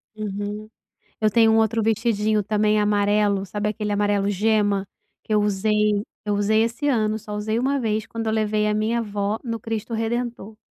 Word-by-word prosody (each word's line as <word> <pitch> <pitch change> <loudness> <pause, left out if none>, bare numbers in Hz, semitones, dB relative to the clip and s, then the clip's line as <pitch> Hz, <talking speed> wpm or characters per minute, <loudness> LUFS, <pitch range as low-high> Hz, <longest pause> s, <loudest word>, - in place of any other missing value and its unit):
Uhum. 210 0 -5 0.5
Eu 215 -1 +3
tenho 225 0 +4
um 220 - +4
outro 225 +1 +2
vestidinho 215 -1 +1
também 210 +1 +1
amarelo, 205 -1 +2
sabe 210 +2 -2
aquele 210 0 -3
amarelo 205 -1 +1
gema? 205 -1 +1 0.4
Que - - -6
eu 210 - +4
usei 210 0 +1 0.2
eu 210 - 0
usei 215 +2 +2
esse 240 +6 -2
ano, 215 -5 +1
só 210 0 -7
usei 215 +2 -2
uma 275 +2 +1
vez 220 -3 -1
quando 230 -1 -5
eu 220 - +1
levei 215 -1 +1
a 210 - +1
minha 220 +2 0
avó 205 -1 -2
no 230 -2 -3
Cristo 225 0 -4
Redentor. 225 -1 -3
215 Hz, 180 wpm, -23 LUFS, 205-225 Hz, 0.5 s, tenho